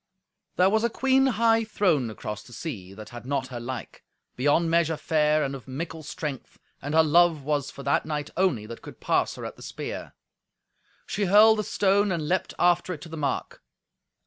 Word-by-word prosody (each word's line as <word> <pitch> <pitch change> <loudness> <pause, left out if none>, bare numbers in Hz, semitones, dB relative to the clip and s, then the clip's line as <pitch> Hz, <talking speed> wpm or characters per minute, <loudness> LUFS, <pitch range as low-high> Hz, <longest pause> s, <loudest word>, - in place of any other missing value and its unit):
There 185 +2 +4
was 220 +1 +2
a 235 - +2
queen 265 +3 +3
high 225 -2 +3
throned 175 - +1
across 105 -1 -6
the 120 - -15
sea, 100 - -7
that 110 0 -10
had 120 0 -9
not 130 0 -2
her 125 -2 -6
like, 120 -1 -7 0.3
beyond 145 +5 +2
measure 165 -1 +2
fair 155 -1 +2
and 135 - -2
of 135 -1 -9
mickle 160 +4 -5
strength, 150 -2 -6 0.2
and 145 +3 -3
her 160 - +7
love 165 -1 +4
was 145 -1 -1
for 140 - -10
that 140 - +2
knight 150 -1 -4
only 175 - +1
that 115 +1 -9
could - - -11
pass - - +1
her - - -7
at - - -7
the - - -15
spear. - - -6 0.9
She 205 - -1
hurled 215 +3 +6
the - - 0
stone 200 0 +2
and 160 -4 -2
leapt 185 +2 -1
after 175 +1 +2
it 150 - -14
to 170 - -10
the 160 - -7
mark. 145 -4 -3
155 Hz, 200 wpm, -26 LUFS, 135-185 Hz, 0.9 s, her